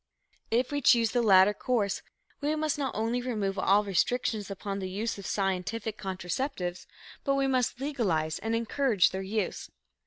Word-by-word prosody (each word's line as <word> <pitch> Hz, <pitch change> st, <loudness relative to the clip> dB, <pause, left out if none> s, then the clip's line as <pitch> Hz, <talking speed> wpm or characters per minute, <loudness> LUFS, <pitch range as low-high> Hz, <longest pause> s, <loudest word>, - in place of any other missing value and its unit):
If 245 Hz, +4 st, +1 dB
we 290 Hz, 0 st, -1 dB
choose 230 Hz, -4 st, +5 dB
the 245 Hz, -, +2 dB
latter 195 Hz, -2 st, +6 dB
course, 210 Hz, -4 st, -1 dB, 0.4 s
we 295 Hz, +2 st, 0 dB
must 310 Hz, -1 st, -1 dB
not 270 Hz, -2 st, -2 dB
only 230 Hz, +3 st, 0 dB
remove 210 Hz, -6 st, -2 dB
all 200 Hz, +2 st, +4 dB
restrictions 210 Hz, +2 st, 0 dB
upon 195 Hz, 0 st, -4 dB
the 190 Hz, -1 st, -4 dB
use 205 Hz, +3 st, -3 dB
of 195 Hz, -, -7 dB
scientific 200 Hz, +3 st, -2 dB
contraceptives, 185 Hz, -, -4 dB, 0.4 s
but 275 Hz, -, +1 dB
we 275 Hz, 0 st, +2 dB
must 255 Hz, -2 st, 0 dB
legalize 195 Hz, -, -1 dB
and 225 Hz, +1 st, -1 dB
encourage 230 Hz, -3 st, +2 dB
their 190 Hz, -, -3 dB
use. 205 Hz, +3 st, -3 dB
220 Hz, 160 wpm, -29 LUFS, 195-250 Hz, 0.4 s, latter